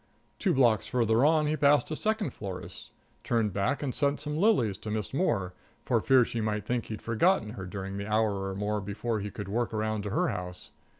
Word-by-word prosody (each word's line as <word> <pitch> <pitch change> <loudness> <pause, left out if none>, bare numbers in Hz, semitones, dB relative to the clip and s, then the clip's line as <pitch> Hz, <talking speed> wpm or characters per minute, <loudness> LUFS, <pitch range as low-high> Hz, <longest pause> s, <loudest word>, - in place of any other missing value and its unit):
Two - - +2
blocks 120 -6 +3
farther 115 -1 +2
on 155 +1 +4
he 150 +1 +1
passed 145 -1 +3
a - - -1
second 215 +3 -1
florist's, 95 -3 -7 0.3
turned 110 -4 0
back 105 +10 0
and 130 -3 -2
sent 140 -1 0
some 150 0 -4
lilies 155 - +3
to 110 - -7
Miss 105 +2 -3
Moore, 105 - 0 0.3
for - - +2
fear 130 -2 +5
she 115 - -3
might 105 -1 -2
think 120 0 -1
he'd 110 - -6
forgotten 115 - +2
her 95 -5 -7
during 95 0 -5
the 100 +1 -5
hour 105 -3 +1
or 95 - -5
more 105 +1 -1
before 105 +3 -3
he 105 +1 -4
could 100 0 -7
work 115 +4 -1
around 110 0 -1
to 100 - -4
her 175 - +1
house. 90 0 -6
110 Hz, 215 wpm, -29 LUFS, 100-140 Hz, 0.3 s, fear